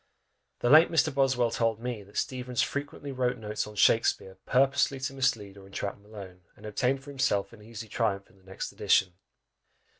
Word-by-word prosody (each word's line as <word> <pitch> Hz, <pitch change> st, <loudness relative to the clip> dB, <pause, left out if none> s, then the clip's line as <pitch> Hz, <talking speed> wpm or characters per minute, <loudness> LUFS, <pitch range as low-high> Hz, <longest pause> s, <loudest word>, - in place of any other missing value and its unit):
The 120 Hz, -, +1 dB
late 155 Hz, +3 st, +8 dB
Mr. 160 Hz, -2 st, +2 dB
Boswell 130 Hz, -3 st, +2 dB
told 115 Hz, -2 st, 0 dB
me, 120 Hz, -2 st, -4 dB
that 100 Hz, +1 st, -13 dB
Steevens 125 Hz, -1 st, -1 dB
frequently 145 Hz, 0 st, -5 dB
wrote 125 Hz, -1 st, -1 dB
notes 105 Hz, -1 st, -4 dB
on 105 Hz, -, -11 dB
Shakspeare, 100 Hz, -3 st, +2 dB
purposely 135 Hz, +1 st, +2 dB
to 135 Hz, +1 st, -3 dB
mislead 115 Hz, -8 st, -1 dB
or 95 Hz, -1 st, -13 dB
entrap 100 Hz, +1 st, -5 dB
Malone, 100 Hz, -3 st, -11 dB
and 105 Hz, -, -14 dB
obtain 125 Hz, +5 st, 0 dB
for 135 Hz, +2 st, -11 dB
himself 130 Hz, -7 st, 0 dB
an 110 Hz, -, -14 dB
easy 110 Hz, +1 st, -9 dB
triumph 100 Hz, -3 st, -1 dB
in -, -, -24 dB
the -, -, -27 dB
next 95 Hz, 0 st, -6 dB
edition! 90 Hz, -2 st, +2 dB
115 Hz, 180 wpm, -28 LUFS, 100-135 Hz, -, late